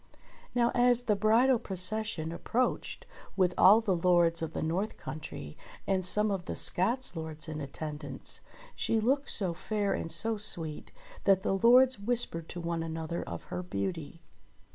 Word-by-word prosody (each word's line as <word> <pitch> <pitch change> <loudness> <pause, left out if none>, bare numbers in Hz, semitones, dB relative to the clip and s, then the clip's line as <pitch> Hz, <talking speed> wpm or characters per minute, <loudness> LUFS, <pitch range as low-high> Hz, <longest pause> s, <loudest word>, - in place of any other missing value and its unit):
Now 240 -1 +2
as 245 0 +4
the 215 -4 +1
bridal 230 +5 +3
procession 190 -4 -3
approached 240 +8 -3 0.3
with 180 -2 +2
all 210 +4 +6
the 200 -5 0
lords 170 -1 +2
of 160 -1 -4
the - - -3
north 185 +7 -2
countrie, 110 - -8 0.3
and 190 -1 0
some 210 +3 +4
of 190 -3 -4
the - - -5
Scots 230 +4 +2
lords 160 -1 -5
in 155 -1 -6
attendance, 145 0 -1 0.3
she 225 - 0
looked 270 +6 0
so 185 -5 +2
fair 205 +3 -2
and 165 - -2
so 225 -1 +3
sweet, 165 -7 -2 0.3
that 195 -1 +3
the - - 0
lords 245 +4 +4
whispered 200 -7 -1
to 175 - -7
one 170 -1 -3
another 165 +1 -5
of - - -7
her - - -3
beauty. 170 -3 -5
185 Hz, 160 wpm, -29 LUFS, 165-220 Hz, 0.3 s, all